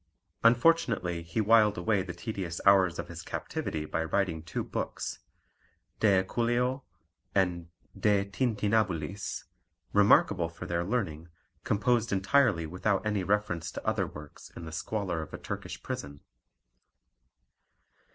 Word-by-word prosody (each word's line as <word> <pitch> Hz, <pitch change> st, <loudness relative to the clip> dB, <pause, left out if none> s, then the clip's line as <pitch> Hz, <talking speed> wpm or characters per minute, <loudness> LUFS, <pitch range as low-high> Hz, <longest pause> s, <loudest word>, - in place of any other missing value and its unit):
Unfortunately 115 Hz, -, +3 dB
he 85 Hz, +5 st, -4 dB
whiled 110 Hz, -1 st, +5 dB
away 95 Hz, +3 st, +1 dB
the 95 Hz, -1 st, -5 dB
tedious 95 Hz, -6 st, -4 dB
hours 95 Hz, -3 st, +5 dB
of -, -, -4 dB
his 85 Hz, 0 st, -8 dB
captivity 80 Hz, -1 st, -4 dB
by 80 Hz, -, -2 dB
writing 80 Hz, -1 st, 0 dB
two 85 Hz, +1 st, -4 dB
books, -, -, -4 dB, 0.8 s
De 100 Hz, -4 st, +4 dB
equuleo 120 Hz, +6 st, 0 dB, 0.5 s
and 90 Hz, -3 st, +1 dB, 0.3 s
De 100 Hz, -2 st, +2 dB
tintinnabulis, 100 Hz, -, -1 dB, 0.5 s
remarkable 100 Hz, -4 st, +4 dB
for 85 Hz, +2 st, -9 dB
their 85 Hz, -1 st, -1 dB
learning, 85 Hz, -6 st, -2 dB, 0.3 s
composed 115 Hz, +2 st, +1 dB
entirely 100 Hz, -2 st, +3 dB
without 95 Hz, +5 st, -1 dB
any 105 Hz, -3 st, 0 dB
reference 100 Hz, -4 st, 0 dB
to -, -, -8 dB
other -, -, +1 dB
works 75 Hz, 0 st, -11 dB
in 85 Hz, -, -8 dB
the 80 Hz, -, -7 dB
squalor 90 Hz, 0 st, -2 dB
of 80 Hz, -, -7 dB
a -, -, -6 dB
Turkish -, -, -6 dB
prison. 70 Hz, 0 st, -6 dB
95 Hz, 125 wpm, -29 LUFS, 85-110 Hz, 0.8 s, whiled